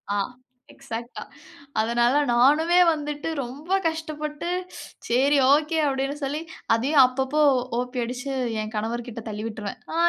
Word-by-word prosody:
ஆ, -, -, 0 dB, 0.6 s
எக்ஸாட்டா. 235 Hz, -3 st, -7 dB, 0.6 s
அதனால 235 Hz, +3 st, +2 dB, 0.2 s
நானுமே 300 Hz, +9 st, +4 dB
வந்துட்டு 295 Hz, +1 st, -4 dB
ரொம்ப 285 Hz, +9 st, -9 dB, 0.2 s
கஷ்டப்பட்டு 310 Hz, 0 st, -4 dB, 0.6 s
"சரி, 275 Hz, +4 st, +3 dB, 0.2 s
ஓகே" 305 Hz, +2 st, +1 dB
அப்டினு 275 Hz, +1 st, -1 dB
சொல்லி 290 Hz, +3 st, -2 dB, 0.3 s
அதயும் 270 Hz, +4 st, +5 dB
அப்பப்போ 265 Hz, +4 st, 0 dB, 0.4 s
ஓப்பி 250 Hz, 0 st, -3 dB
அடிச்சு 255 Hz, +3 st, -4 dB, 0.3 s
என் 215 Hz, +1 st, -6 dB
கணவர் 230 Hz, +2 st, -2 dB
கிட்ட 230 Hz, -1 st, -7 dB
தள்ளி 210 Hz, 0 st, -5 dB
விட்டுருவேன். 215 Hz, -3 st, -6 dB
"ஆ -, -, -3 dB
270 Hz, 125 wpm, -24 LUFS, 240-300 Hz, 0.6 s, அதயும்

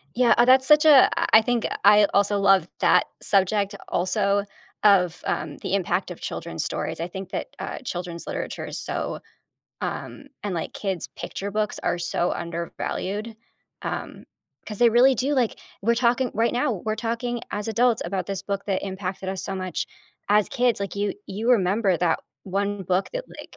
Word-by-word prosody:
Yeah, 245 Hz, -1 st, +5 dB
uh, 240 Hz, -, +6 dB
that's 260 Hz, +1 st, +6 dB
such 300 Hz, +2 st, +6 dB
a 285 Hz, -4 st, +8 dB
I -, -, +2 dB
I -, -, 0 dB
think 240 Hz, 0 st, 0 dB, 0.2 s
I 210 Hz, +1 st, +7 dB
also 200 Hz, 0 st, +3 dB
love 195 Hz, -1 st, +4 dB
that -, -, +4 dB, 0.2 s
subject 200 Hz, +1 st, +1 dB
also 200 Hz, +3 st, +1 dB, 0.4 s
of, 180 Hz, -4 st, +4 dB
um, 150 Hz, -2 st, -2 dB
the 190 Hz, -, -4 dB
impact 190 Hz, -3 st, 0 dB
of -, -, -9 dB
children's -, -, -4 dB
stories. -, -, -3 dB
I 170 Hz, -, -2 dB
think 190 Hz, +1 st, -8 dB
that, -, -, -3 dB
uh, -, -, -5 dB
children's 175 Hz, -, -6 dB
literature -, -, -4 dB
is -, -, -6 dB
so, -, -, -4 dB, 0.6 s
um -, -, -5 dB, 0.2 s
and 200 Hz, -, -2 dB
like 165 Hz, -, -3 dB
kids 190 Hz, -4 st, -3 dB
picture 200 Hz, +1 st, -5 dB
books 210 Hz, 0 st, -1 dB
are 175 Hz, -, +1 dB
so 175 Hz, 0 st, -1 dB
undervalued, 190 Hz, +5 st, -4 dB, 0.5 s
um, -, -, -5 dB, 0.4 s
'cause 210 Hz, -2 st, -6 dB
they 240 Hz, -, +6 dB
really 250 Hz, +4 st, +6 dB
do, 270 Hz, +5 st, 0 dB
like 245 Hz, -4 st, 0 dB, 0.2 s
we're 235 Hz, +3 st, +3 dB
talking 245 Hz, +1 st, +2 dB
right 230 Hz, +2 st, +2 dB
now, 245 Hz, 0 st, +1 dB
we're 215 Hz, 0 st, -1 dB
talking 240 Hz, +1 st, -2 dB
as 205 Hz, +2 st, -3 dB
adults 235 Hz, +1 st, +2 dB
about 185 Hz, 0 st, -3 dB
this 195 Hz, -1 st, -4 dB
book 200 Hz, 0 st, -3 dB
that 195 Hz, -2 st, -1 dB
impacted 190 Hz, -1 st, -4 dB
us 190 Hz, -1 st, -4 dB
so 195 Hz, -, -3 dB
much 185 Hz, -2 st, -3 dB, 0.4 s
as 210 Hz, 0 st, +4 dB
kids. 245 Hz, -4 st, +1 dB
Like, 200 Hz, -1 st, -4 dB
you 205 Hz, 0 st, 0 dB
you 220 Hz, +5 st, -1 dB
remember 195 Hz, -3 st, +3 dB
that 170 Hz, -2 st, +1 dB, 0.2 s
1 200 Hz, +1 st, -2 dB
book 185 Hz, +2 st, 0 dB
that, -, -, -3 dB
like -, -, -11 dB
200 Hz, 180 wpm, -24 LUFS, 190-235 Hz, 0.6 s, a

